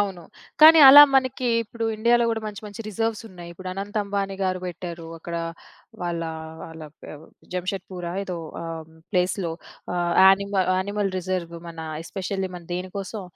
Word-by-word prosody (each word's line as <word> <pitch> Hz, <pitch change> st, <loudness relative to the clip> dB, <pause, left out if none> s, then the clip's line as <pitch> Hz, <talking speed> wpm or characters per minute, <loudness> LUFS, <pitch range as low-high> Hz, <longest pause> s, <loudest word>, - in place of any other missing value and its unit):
అవును. 195 Hz, -4 st, -2 dB, 0.4 s
కానీ 320 Hz, +1 st, +10 dB
అలా 290 Hz, +2 st, +12 dB
మనకి 260 Hz, -1 st, +1 dB, 0.2 s
ఇప్పుడు 230 Hz, +1 st, -6 dB
ఇండియాలో 235 Hz, +2 st, +3 dB
గూడా 225 Hz, -1 st, -2 dB
మంచి 210 Hz, 0 st, -7 dB
మంచి 205 Hz, +2 st, -9 dB
రిజర్వ్స్ 225 Hz, +2 st, -2 dB
ఉన్నాయి. 175 Hz, -2 st, -11 dB
ఇప్పుడు 185 Hz, +2 st, -9 dB
అనంత్ 200 Hz, +2 st, -6 dB
అంబానీ 200 Hz, -1 st, -3 dB
గారు 185 Hz, -1 st, 0 dB
పెట్టారు. 170 Hz, -1 st, -7 dB
అక్కడ 170 Hz, +1 st, -6 dB, 0.7 s
వాళ్ళ, 170 Hz, -1 st, -2 dB, 0.4 s
వాళ్ళ 160 Hz, -1 st, -10 dB, 0.2 s
పె -, -, -9 dB, 0.4 s
జంషెడ్పూరా! 180 Hz, -1 st, -4 dB
ఏదో. 180 Hz, -2 st, -5 dB, 0.2 s
ఆహ్, 165 Hz, -1 st, -7 dB, 0.2 s
ప్లేస్‌లో 180 Hz, -1 st, 0 dB, 0.4 s
ఆహ్, 175 Hz, -1 st, 0 dB
యానిమల్ 195 Hz, 0 st, +3 dB
యానిమల్ 200 Hz, +1 st, -1 dB
రిజర్వ్ 180 Hz, -2 st, -3 dB
మన 165 Hz, -1 st, -11 dB, 0.2 s
ఎస్పెషల్లీ 190 Hz, +1 st, -4 dB
మన 175 Hz, -, -8 dB
దేనికోసం 190 Hz, +3 st, -5 dB
190 Hz, 145 wpm, -24 LUFS, 175-205 Hz, 0.7 s, అలా